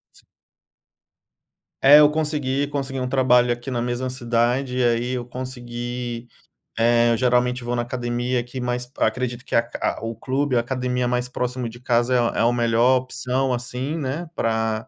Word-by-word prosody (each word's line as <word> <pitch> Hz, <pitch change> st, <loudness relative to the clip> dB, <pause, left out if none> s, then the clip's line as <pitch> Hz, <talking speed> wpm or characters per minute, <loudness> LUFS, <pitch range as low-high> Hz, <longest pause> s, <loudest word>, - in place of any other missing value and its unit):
S -, -, -19 dB, 1.6 s
É, 145 Hz, +2 st, +9 dB
eu 150 Hz, -, +7 dB
consegui 145 Hz, -3 st, -1 dB
consegui 135 Hz, -2 st, -3 dB
um 125 Hz, -, -2 dB
trabalho 125 Hz, -2 st, +4 dB
aqui 120 Hz, +2 st, -8 dB
na 120 Hz, -2 st, -1 dB
mesma 125 Hz, +1 st, -2 dB
cidade, 125 Hz, +1 st, 0 dB
e 130 Hz, -, +2 dB
aí 120 Hz, +1 st, +1 dB
eu 125 Hz, -1 st, -3 dB
consegui, 120 Hz, -1 st, -6 dB, 0.5 s
eh, 120 Hz, +1 st, +4 dB
eu 115 Hz, -, +2 dB
geralmente 125 Hz, 0 st, +1 dB
vou 120 Hz, +1 st, -2 dB
na 120 Hz, -, 0 dB
academia 120 Hz, +1 st, -2 dB
aqui, 120 Hz, +2 st, -6 dB
mas 125 Hz, 0 st, -2 dB
p 130 Hz, -, -4 dB
acredito 125 Hz, -1 st, -1 dB
que -, -, -3 dB
a -, -, +7 dB
aca 115 Hz, -1 st, -3 dB
o 115 Hz, -, -3 dB
clube, 130 Hz, +4 st, -1 dB
a -, -, +4 dB
academia 125 Hz, 0 st, -1 dB
mais 125 Hz, 0 st, 0 dB
próximo 125 Hz, 0 st, -3 dB
de 120 Hz, +1 st, -10 dB
casa 120 Hz, 0 st, +1 dB
é -, -, +4 dB
a 120 Hz, -1 st, 0 dB
é -, -, +3 dB
o 120 Hz, +1 st, +3 dB
melhor 120 Hz, +2 st, +3 dB
opção, 130 Hz, +1 st, -1 dB
assim, 125 Hz, +5 st, -3 dB
né, 155 Hz, +3 st, -4 dB
pra 110 Hz, 0 st, -1 dB
125 Hz, 180 wpm, -22 LUFS, 120-130 Hz, 1.6 s, É